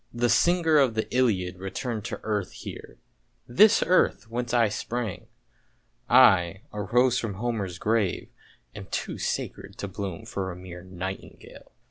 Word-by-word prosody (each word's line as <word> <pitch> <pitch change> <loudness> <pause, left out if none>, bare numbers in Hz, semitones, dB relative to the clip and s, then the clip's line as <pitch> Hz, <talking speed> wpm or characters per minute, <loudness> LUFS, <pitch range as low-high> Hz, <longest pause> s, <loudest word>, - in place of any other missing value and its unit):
The 120 0 0
singer 170 -1 +3
of 130 -5 +3
the 110 - -1
Iliad 95 -8 +1
re 95 +1 -5
turned 115 -1 -4
to - - -5
earth 105 -3 -2
here, - - -9 0.5
this 210 - +5
earth 180 -9 +2
whence 120 0 -3
I 120 -2 +4
sprang! 110 0 -4 0.5
— - - -40
I, 95 -7 +5
a 105 - -3
rose 120 +5 +2
from 105 -4 -4
Homer's 100 -5 -3
grave, 105 -2 0 0.4
am - - -9
too - - -4
sacred 100 +2 -4
to 100 - -4
bloom 95 -2 -6
for 95 -1 -4
a - - -8
mere 90 -1 -10
nightingale! 95 +1 -8
110 Hz, 155 wpm, -26 LUFS, 95-120 Hz, 0.5 s, this